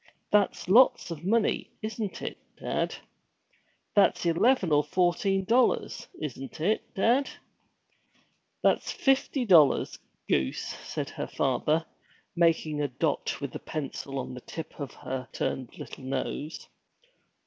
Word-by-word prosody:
That's 205 Hz, -3 st, +2 dB
lots 220 Hz, -3 st, +5 dB
of 165 Hz, -1 st, -6 dB
money, 215 Hz, +3 st, +1 dB
isn't 215 Hz, -2 st, -4 dB
it, -, -, -5 dB, 0.2 s
dad? -, -, -1 dB, 1.0 s
That's 200 Hz, -3 st, +4 dB
eleven 180 Hz, +3 st, +3 dB
or 145 Hz, 0 st, +5 dB
fourteen 185 Hz, +4 st, +1 dB
dollars, 240 Hz, +5 st, +2 dB
isn't 135 Hz, -2 st, -6 dB
it, 200 Hz, +8 st, 0 dB
dad?' 240 Hz, +7 st, +3 dB, 1.3 s
'That's -, -, +2 dB
fifty 270 Hz, -1 st, +1 dB
dollars, 165 Hz, -9 st, +5 dB, 0.3 s
goose!' 65 Hz, -1 st, 0 dB
said -, -, -4 dB
her -, -, -4 dB
father, 150 Hz, +5 st, +1 dB, 0.5 s
making 160 Hz, -3 st, +2 dB
a 145 Hz, -, +1 dB
dot 125 Hz, -, -1 dB
with -, -, -4 dB
the -, -, -6 dB
pencil 140 Hz, -2 st, -5 dB
on 130 Hz, -1 st, -4 dB
the 125 Hz, -, -8 dB
tip 160 Hz, +4 st, -8 dB
of 140 Hz, -2 st, -4 dB
her 130 Hz, -1 st, -5 dB
upturned 130 Hz, -3 st, -3 dB
little -, -, -9 dB
nose. 135 Hz, +4 st, -4 dB
165 Hz, 125 wpm, -28 LUFS, 140-205 Hz, 1.3 s, lots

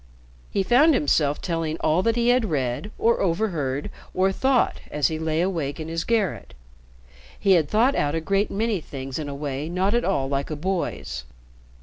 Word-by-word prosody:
He 195 Hz, -, 0 dB
found 275 Hz, -, +5 dB
himself 145 Hz, -, +1 dB
telling 165 Hz, -2 st, -2 dB
all 160 Hz, +3 st, +2 dB
that 230 Hz, +3 st, +1 dB
he 240 Hz, 0 st, +2 dB
had 245 Hz, -1 st, +3 dB
read, 135 Hz, +4 st, -1 dB
or 235 Hz, +1 st, +2 dB
overheard, 165 Hz, -8 st, -1 dB, 0.2 s
or 190 Hz, +1 st, +3 dB
thought 260 Hz, +5 st, +2 dB
as 150 Hz, -2 st, +1 dB
he 160 Hz, -1 st, -3 dB
lay 160 Hz, 0 st, 0 dB
awake 165 Hz, -6 st, -2 dB
in 160 Hz, 0 st, -5 dB
his 165 Hz, 0 st, -2 dB
garret. 215 Hz, -, -1 dB, 0.8 s
He 200 Hz, -, +2 dB
had 165 Hz, -6 st, +4 dB
thought 240 Hz, +6 st, +3 dB
out 145 Hz, -, 0 dB
a -, -, +1 dB
great 195 Hz, +5 st, 0 dB
many 215 Hz, -2 st, -1 dB
things 135 Hz, -1 st, -6 dB
in 150 Hz, -2 st, -4 dB
a 140 Hz, -, -5 dB
way 145 Hz, +1 st, -4 dB
not 185 Hz, +4 st, 0 dB
at 240 Hz, +1 st, +2 dB
all 140 Hz, -9 st, 0 dB
like 140 Hz, 0 st, -2 dB
a 155 Hz, -, -3 dB
boy's. 165 Hz, -, -3 dB
165 Hz, 190 wpm, -24 LUFS, 145-205 Hz, 0.8 s, found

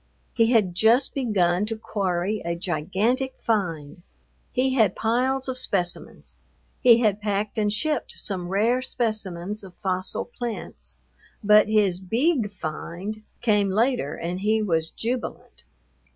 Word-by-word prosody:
He 230 Hz, -2 st, +3 dB
had 210 Hz, -7 st, +3 dB
just 225 Hz, +8 st, +4 dB
begun 205 Hz, -7 st, +1 dB
to 225 Hz, -, -2 dB
quarry 195 Hz, -1 st, -2 dB
a 170 Hz, 0 st, -2 dB
gigantic 195 Hz, -, -1 dB
find; 175 Hz, -8 st, -2 dB, 0.5 s
he 260 Hz, +1 st, +1 dB
had 220 Hz, -7 st, +3 dB
piles 255 Hz, +4 st, 0 dB
of 255 Hz, -1 st, -2 dB
specimens; 190 Hz, -8 st, -1 dB, 0.4 s
he 235 Hz, -1 st, +6 dB
had 210 Hz, -2 st, +1 dB
packed 205 Hz, +1 st, -1 dB
and 210 Hz, -1 st, +1 dB
shipped 265 Hz, +6 st, -1 dB
some 185 Hz, -3 st, -3 dB
rare 225 Hz, +6 st, +2 dB
specimens 210 Hz, -6 st, -3 dB
of 185 Hz, -2 st, -12 dB
fossil 185 Hz, -1 st, -2 dB
plants, 220 Hz, -, -7 dB, 0.5 s
but 210 Hz, +1 st, +6 dB
his 205 Hz, -4 st, +2 dB
"beeg 230 Hz, -, +1 dB
find" 185 Hz, +4 st, -6 dB, 0.2 s
came 210 Hz, -4 st, +2 dB
later 220 Hz, -, +1 dB
and 175 Hz, +2 st, -4 dB
he 215 Hz, +3 st, +2 dB
was 165 Hz, -5 st, 0 dB
jubilant. 240 Hz, +2 st, -5 dB
210 Hz, 130 wpm, -24 LUFS, 185-235 Hz, 0.5 s, he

